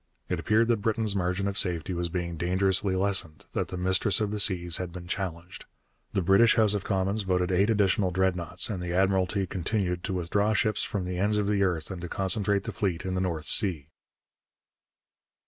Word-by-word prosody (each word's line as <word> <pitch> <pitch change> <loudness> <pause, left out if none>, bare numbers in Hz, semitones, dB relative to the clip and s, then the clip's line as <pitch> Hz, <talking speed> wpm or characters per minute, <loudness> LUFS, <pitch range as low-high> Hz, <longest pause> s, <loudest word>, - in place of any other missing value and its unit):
It - - -1
appeared 110 +2 +2
that 115 - +3
Britain's 110 -1 0
margin 90 +1 -1
of 100 0 -2
safety 90 -1 -1
was 85 0 -2
being 85 -1 -3
dangerously 95 +3 +1
lessened, 95 -6 -1
that - - -1
the 90 - -6
Mistress 95 +2 +1
of 105 -2 -1
the 105 - -3
Seas 90 -4 +2
had 90 -2 -5
been 90 0 -9
challenged. 90 -2 -5 0.5
The 95 - 0
British 100 +6 +5
House 110 -3 +3
of 100 -2 -2
Commons 100 +2 -1
voted 90 -1 0
eight 95 +4 +2
additional 100 -3 +2
Dreadnoughts 90 -2 0
and 95 -4 -4
the 90 -1 -4
Admiralty 95 +1 +1
continued 90 -1 -2
to - - -3
withdraw 100 +4 0
ships 110 0 +1
from 100 -3 -3
the 90 0 -4
ends 105 +2 +2
of 105 - 0
the 100 -1 0
earth 90 -3 0
and 90 -2 -6
to 90 - -6
concentrate 100 +2 +1
the 115 - -5
fleet 95 -3 -2
in 95 - -2
the 95 - -1
North 85 -4 -2
Sea. 85 -9 +1
95 Hz, 200 wpm, -27 LUFS, 90-100 Hz, 0.5 s, British